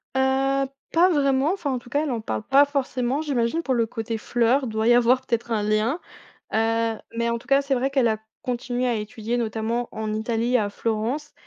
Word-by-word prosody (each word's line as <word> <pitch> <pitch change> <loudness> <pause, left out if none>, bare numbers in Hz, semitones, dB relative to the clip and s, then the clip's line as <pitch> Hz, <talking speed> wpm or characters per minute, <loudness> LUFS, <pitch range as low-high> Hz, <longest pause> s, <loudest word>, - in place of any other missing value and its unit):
Heu, 270 +1 +2 0.2
pas 350 +3 +5
vraiment, 280 +1 +2
enfin 305 -8 -2
en 255 - -1
tout 240 - -16
cas 290 +4 +1
elle 295 - -2
en 230 -3 -2
parle 110 - -3
pas 280 +2 +5
forcément 270 -1 -1
j'imagine 275 +1 0
pour 265 - 0
le 235 -2 +2
côté 225 0 -4
fleur, 240 +4 +2
il 255 - -3
doit 220 +1 -1
y 240 - +7
avoir 245 +1 +4
peut-être 235 0 -2
un 215 -2 +1
lien, 215 +9 +1 0.5
heu, 225 0 +1 0.2
mais 235 0 +1
en 235 - 0
tout 240 - -15
cas 275 +1 +4
c'est 275 -1 0
vrai 260 +2 0
qu'elle 270 -3 +2
a 220 -1 +1 0.2
continué 250 0 -2
à 240 - +1
étudier 220 +2 -3
notamment 230 +1 -2
en 215 -1 -3
Italie, 230 +3 0
à 210 -3 0
Florence, 230 +8 -2
240 Hz, 215 wpm, -24 LUFS, 225-270 Hz, 0.5 s, y